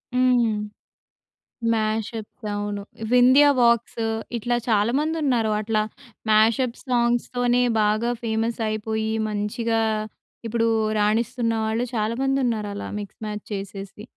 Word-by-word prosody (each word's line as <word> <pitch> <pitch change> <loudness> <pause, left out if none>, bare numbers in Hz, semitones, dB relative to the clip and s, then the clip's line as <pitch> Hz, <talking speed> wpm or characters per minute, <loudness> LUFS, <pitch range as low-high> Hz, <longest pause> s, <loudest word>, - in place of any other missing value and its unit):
హ్మ్. 245 -4 +3 1.2
మ్యాష్అప్స్ 220 0 -3
అవును. 205 0 -3 0.3
వింధ్యా 255 +4 +7
వాక్స్ 235 -1 +2 0.4
ఇట్లా 240 +2 0
చాలామందున్నారు 245 +2 +1
అట్లా, 215 0 0 0.5
మ్యాష్అప్ 230 +3 +3
సాంగ్స్‌తోనే 245 0 +1 0.2
బాగా 215 +3 +2
ఫేమస్ 225 +1 -1
అయిపోయి, 220 0 -2 0.2
మంచిగా 220 +2 -1 0.7
ఇప్పుడు 230 0 +1 0.3
రాణిస్తున్న 230 +2 +1
వాళ్ళు 225 +3 0
చాలామందున్నారు 230 -1 0
అలా, 205 - -5
మిక్స్ 205 +1 -10
మ్యాచ్ 210 -1 -5
చేసేసి. 195 0 -6
225 Hz, 95 wpm, -24 LUFS, 215-245 Hz, 1.2 s, వింధ్యా